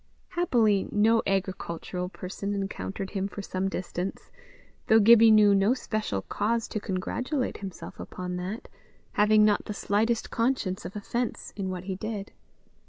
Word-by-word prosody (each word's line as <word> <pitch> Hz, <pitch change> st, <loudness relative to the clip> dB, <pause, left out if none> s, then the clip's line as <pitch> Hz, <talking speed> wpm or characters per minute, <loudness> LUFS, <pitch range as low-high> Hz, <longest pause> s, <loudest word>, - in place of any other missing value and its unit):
Happily 230 Hz, -, +2 dB
no 225 Hz, +2 st, +4 dB
agricultural 180 Hz, -2 st, -2 dB
person 200 Hz, +2 st, -5 dB
encountered 195 Hz, 0 st, -4 dB
him 195 Hz, -1 st, -1 dB
for 200 Hz, 0 st, -7 dB
some 190 Hz, 0 st, -2 dB
distance, 185 Hz, 0 st, -5 dB, 0.6 s
though 220 Hz, -, +6 dB
Gibbie 225 Hz, +1 st, +8 dB
knew 210 Hz, -2 st, +7 dB
no 200 Hz, +5 st, +3 dB
special 215 Hz, -, -3 dB
cause 230 Hz, +2 st, -1 dB
to 215 Hz, -, -2 dB
congratulate 245 Hz, +9 st, -2 dB
himself 190 Hz, -3 st, -8 dB
upon 180 Hz, 0 st, -5 dB
that, 190 Hz, +5 st, -5 dB, 0.4 s
having 210 Hz, 0 st, +5 dB
not 210 Hz, -1 st, +2 dB
the 210 Hz, -, -5 dB
slightest 220 Hz, +4 st, 0 dB
conscience 230 Hz, -6 st, 0 dB
of 190 Hz, -, -7 dB
offence 235 Hz, +4 st, -3 dB
in 195 Hz, -2 st, -3 dB
what 180 Hz, -1 st, -4 dB
he 190 Hz, 0 st, -3 dB
did. 205 Hz, +1 st, -5 dB
205 Hz, 145 wpm, -27 LUFS, 190-220 Hz, 0.6 s, Gibbie